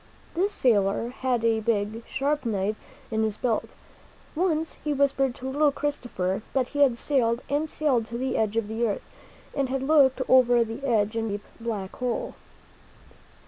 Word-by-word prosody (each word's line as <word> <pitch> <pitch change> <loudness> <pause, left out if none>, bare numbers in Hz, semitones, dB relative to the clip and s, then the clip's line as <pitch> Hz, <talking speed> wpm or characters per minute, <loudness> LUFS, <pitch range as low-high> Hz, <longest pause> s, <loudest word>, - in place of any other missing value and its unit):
This 385 +4 +1
sailor 225 - +2
had 250 -2 -1
a 225 -1 +3
big, 215 0 -1
sharp 285 +1 -1
knife 210 -2 -1 0.4
in 220 0 +1
his 215 -1 0
belt. 235 -3 -1 0.6
Once 325 -2 0
he 300 - 0
whispered 270 -2 +2
to 260 - -7
little 290 +2 +3
Christopher 245 -11 -2
that 260 -2 +1
he 290 - -4
had 265 -5 +5
sailed 240 -3 +1
and 300 +2 0
sailed 260 -9 +1
to 235 - -5
the 260 +1 -1
edge 220 0 0
of 225 -2 0
the 225 +2 0
earth 205 - -2 0.5
and 275 -2 0
had 265 0 -1
looked 270 -3 +4
over 245 -2 +5
the 225 +4 -7
edge 220 -4 +1
into 225 -2 -1
the - - -1
deep, 205 - -19
black 215 -5 -4
hole. 250 -2 -2
245 Hz, 175 wpm, -26 LUFS, 220-275 Hz, 0.6 s, had